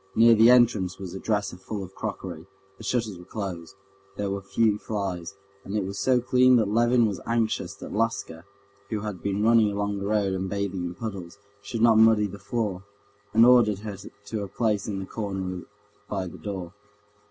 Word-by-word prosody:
Near 115 Hz, +1 st, +7 dB
the 115 Hz, +1 st, +6 dB
entrance 110 Hz, -7 st, +4 dB
was 95 Hz, -3 st, -7 dB
a 95 Hz, -, -5 dB
dresser 100 Hz, -4 st, -1 dB
full 100 Hz, +2 st, -6 dB
of 95 Hz, 0 st, -10 dB
crockery. 95 Hz, -6 st, -6 dB, 0.3 s
The -, -, -10 dB
shutters 110 Hz, -7 st, -1 dB
were -, -, -11 dB
closed, 95 Hz, -3 st, -6 dB, 0.4 s
there 100 Hz, -1 st, -2 dB
were 100 Hz, 0 st, -3 dB
few 105 Hz, +2 st, +1 dB
flies, 100 Hz, -4 st, -4 dB, 0.3 s
and 100 Hz, +2 st, -3 dB
it 100 Hz, -, -1 dB
was 100 Hz, +1 st, -5 dB
so 125 Hz, +5 st, +3 dB
clean 125 Hz, +1 st, +4 dB
that 110 Hz, -4 st, +3 dB
Levin 120 Hz, +1 st, +4 dB
was 100 Hz, -4 st, -2 dB
anxious 110 Hz, -5 st, -1 dB
that -, -, -9 dB
Laska, 100 Hz, -6 st, -2 dB, 0.5 s
who 110 Hz, -2 st, -2 dB
had 105 Hz, -5 st, -5 dB
been 100 Hz, +3 st, -1 dB
running 115 Hz, -2 st, +5 dB
along 100 Hz, 0 st, -2 dB
the 100 Hz, -, -3 dB
road 105 Hz, -2 st, +1 dB
and 95 Hz, 0 st, -2 dB
bathing 100 Hz, -2 st, -2 dB
in 85 Hz, 0 st, -5 dB
puddles, 100 Hz, -4 st, -6 dB, 0.2 s
should 110 Hz, +3 st, -3 dB
not 115 Hz, -2 st, +6 dB
muddy 110 Hz, -1 st, +5 dB
the 100 Hz, 0 st, -7 dB
floor, 105 Hz, -6 st, -2 dB, 0.5 s
and 115 Hz, +2 st, +6 dB
ordered 115 Hz, -5 st, +5 dB
her 105 Hz, -2 st, -4 dB, 0.3 s
to 105 Hz, 0 st, -4 dB
a 100 Hz, -, -4 dB
place 105 Hz, -1 st, -1 dB
in 100 Hz, -3 st, -3 dB
the 95 Hz, -, -4 dB
corner 95 Hz, -4 st, -4 dB, 0.4 s
by 95 Hz, -2 st, -2 dB
the 90 Hz, -, -9 dB
door. 95 Hz, -4 st, -6 dB
100 Hz, 195 wpm, -26 LUFS, 95-110 Hz, 0.5 s, Near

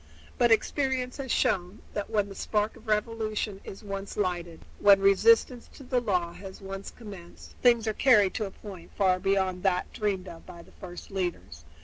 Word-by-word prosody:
But 240 Hz, -1 st, +4 dB
experience 255 Hz, +2 st, +1 dB
has 270 Hz, -3 st, -4 dB
shown 195 Hz, -5 st, 0 dB
that 205 Hz, -, -3 dB
when 210 Hz, -2 st, +1 dB
the 200 Hz, -, -9 dB
spark 210 Hz, +2 st, -1 dB
of 220 Hz, -, -17 dB
revolution 215 Hz, -1 st, -1 dB
is 195 Hz, -, -10 dB
once 195 Hz, -1 st, -6 dB
lighted, 175 Hz, -4 st, -2 dB, 0.2 s
when 200 Hz, -1 st, +7 dB
resistance 225 Hz, +5 st, +4 dB
to 275 Hz, -, -11 dB
the 250 Hz, -1 st, 0 dB
law 180 Hz, -7 st, 0 dB
has 190 Hz, 0 st, -10 dB
once 195 Hz, 0 st, -7 dB
commenced, 195 Hz, -7 st, -12 dB
things 235 Hz, -2 st, +4 dB
are 220 Hz, -, +1 dB
carried 210 Hz, -6 st, +4 dB
to 215 Hz, -, -2 dB
a -, -, -5 dB
point 190 Hz, -4 st, -11 dB
far 185 Hz, -2 st, +3 dB
beyond 190 Hz, -1 st, 0 dB
that 185 Hz, -2 st, 0 dB
dreamed 195 Hz, -3 st, -2 dB
of 165 Hz, -2 st, -10 dB
by 170 Hz, -1 st, -12 dB
the -, -, -20 dB
first 175 Hz, 0 st, -10 dB
leaders. 175 Hz, -, -4 dB
200 Hz, 185 wpm, -28 LUFS, 185-220 Hz, 0.2 s, when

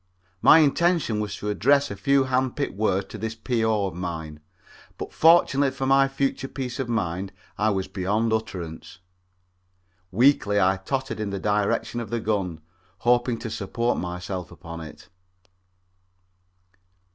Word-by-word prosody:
My -, -, +8 dB
intention 160 Hz, -6 st, +2 dB
was 105 Hz, -1 st, -3 dB
to 105 Hz, -, -4 dB
address 140 Hz, +6 st, +3 dB
a -, -, -4 dB
few 140 Hz, -1 st, +3 dB
handpicked 130 Hz, +2 st, -1 dB
words 100 Hz, -1 st, 0 dB
to -, -, -8 dB
this 110 Hz, 0 st, -4 dB
P.O. 110 Hz, -3 st, 0 dB
of 95 Hz, -, -4 dB
mine, 80 Hz, -3 st, -5 dB, 0.6 s
but -, -, -7 dB
fortunately 155 Hz, -4 st, +5 dB
for 135 Hz, 0 st, -4 dB
my 135 Hz, +1 st, +4 dB
future 135 Hz, 0 st, -2 dB
peace 130 Hz, -2 st, -5 dB
of 130 Hz, -3 st, -2 dB
mind 95 Hz, -4 st, -2 dB, 0.2 s
I 110 Hz, +1 st, +1 dB
was 95 Hz, -2 st, -1 dB
beyond 105 Hz, +4 st, 0 dB
utterance. 90 Hz, -8 st, -5 dB, 1.1 s
Weakly 105 Hz, -2 st, +3 dB
I 95 Hz, 0 st, +3 dB
tottered 130 Hz, +6 st, -3 dB
in 105 Hz, -2 st, -2 dB
the 100 Hz, -, -3 dB
direction 105 Hz, +3 st, 0 dB
of 115 Hz, -3 st, -5 dB
the 120 Hz, -, -1 dB
gun, 95 Hz, -7 st, -2 dB, 0.4 s
hoping 120 Hz, +3 st, +2 dB
to 115 Hz, -, -5 dB
support 115 Hz, +3 st, -1 dB
myself 90 Hz, 0 st, -5 dB
upon 85 Hz, -1 st, -9 dB
it. 80 Hz, -2 st, -11 dB
110 Hz, 145 wpm, -25 LUFS, 95-130 Hz, 1.1 s, My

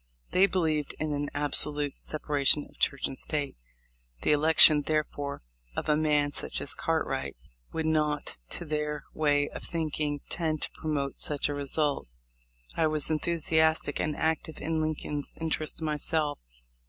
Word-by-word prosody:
They 190 Hz, +2 st, +5 dB
believed 155 Hz, -6 st, 0 dB
in 155 Hz, -1 st, -1 dB
an 145 Hz, 0 st, -2 dB
absolute 145 Hz, 0 st, +2 dB
separation 150 Hz, -1 st, +2 dB
of -, -, -23 dB
Church 140 Hz, -, +1 dB
and 130 Hz, -, -4 dB
State. 145 Hz, -2 st, -2 dB, 0.7 s
The -, -, +3 dB
election, 150 Hz, 0 st, +7 dB
therefore, 145 Hz, -, -2 dB, 0.3 s
of -, -, -2 dB
such 150 Hz, -, +3 dB
a 150 Hz, -, +1 dB
man 150 Hz, -2 st, +2 dB
as -, -, -2 dB
Cartwright 70 Hz, -1 st, -2 dB, 0.3 s
would 160 Hz, -1 st, -2 dB
not, 150 Hz, -2 st, 0 dB
to -, -, -4 dB
their 150 Hz, -1 st, -2 dB
way 145 Hz, -2 st, +2 dB
of -, -, -8 dB
thinking, 155 Hz, -3 st, -2 dB
tend 160 Hz, -3 st, -1 dB
to -, -, -2 dB
promote 145 Hz, -3 st, -3 dB
such 145 Hz, -1 st, 0 dB
a -, -, -1 dB
result. 145 Hz, +1 st, -1 dB, 0.7 s
I 160 Hz, -, +3 dB
was 155 Hz, -1 st, -1 dB
enthusiastic 160 Hz, -1 st, +1 dB
and 150 Hz, -, -1 dB
active 160 Hz, -1 st, -1 dB
in 160 Hz, 0 st, -1 dB
Lincoln's 150 Hz, -2 st, -3 dB
interest 160 Hz, 0 st, -2 dB
myself. 150 Hz, 0 st, 0 dB
150 Hz, 145 wpm, -29 LUFS, 145-155 Hz, 0.7 s, election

